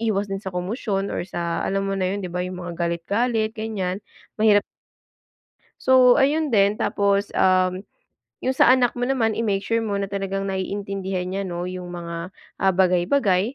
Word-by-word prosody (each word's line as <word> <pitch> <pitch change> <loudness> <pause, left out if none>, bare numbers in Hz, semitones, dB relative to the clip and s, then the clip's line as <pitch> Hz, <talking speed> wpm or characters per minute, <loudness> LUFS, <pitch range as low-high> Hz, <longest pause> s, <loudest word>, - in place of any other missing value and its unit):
iwas 205 -3 0
din 195 - -2
sa 190 - -6
komosyon 195 +2 -2
or - - -2
sa 170 -2 -3
alam 195 0 -1
mo 195 - -1
na 185 0 0
yun, 205 - -3
'di 185 - -5
ba, 180 0 -2
yung 180 0 -6
mga 175 0 -6
galit-galit 210 +7 0
ganiyan, 205 -3 -3 0.3
mahirap 215 -2 +4 1.2
So 255 -1 +6
ayun 295 +1 +2
din, 200 -1 +4
tapos, 200 0 0
um, 185 0 +2 0.6
yung 260 0 0
sa - - +6
anak 250 -2 +2
mo 245 - 0
naman 230 -5 +1
i-make 205 -4 0
sure 230 - 0
mo 205 -2 -2
na 200 - -2
talagang 195 0 -3
naiintindihan 190 -1 -3
niya, 195 +1 -2
'no, 175 -1 -4
yung 180 -1 -6
mga, 170 +1 -6 0.3
ah, 190 0 +3
bagay-bagay. 190 +4 +2
195 Hz, 175 wpm, -23 LUFS, 185-220 Hz, 1.2 s, So